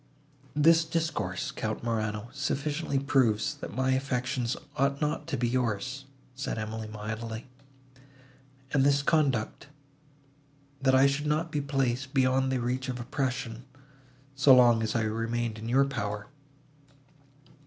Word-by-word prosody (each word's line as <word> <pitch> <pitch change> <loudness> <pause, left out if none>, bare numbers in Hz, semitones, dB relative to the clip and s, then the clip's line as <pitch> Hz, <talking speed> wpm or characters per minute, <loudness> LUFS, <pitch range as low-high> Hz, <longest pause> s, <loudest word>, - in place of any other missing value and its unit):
"This 165 +2 +5
discourse, 160 - -2
Count 110 +1 -4
Morano, 110 -1 -2
sufficiently 145 +1 -1
proves, 130 -6 +2
that - - -7
my 130 +1 +1
affections 130 -2 -1 0.2
ought 140 0 +1
not 150 0 -1
to - - -2
be 120 0 +1
yours," 125 +2 -1 0.3
said 135 -2 -4
Emily, 110 0 -4
mildly, 110 +1 -5 1.3
"and 135 -2 +4
this 140 0 +3
conduct, 140 -7 +1 1.1
that 130 -1 +4
I 130 +1 +6
should 140 +2 +1
not 155 +2 0
be 150 - 0
placed 135 -1 -1
beyond 130 0 +3
the 130 - 0
reach 125 +2 -2
of 125 -1 -3
oppression, 125 -1 -3 0.7
so 135 0 +6
long 120 -2 +6
as 110 +1 -1
I 115 - +2
remained 115 +1 -2
in 115 +1 -5
your 135 +3 +4
power. 105 -6 -3
130 Hz, 130 wpm, -29 LUFS, 115-140 Hz, 1.3 s, I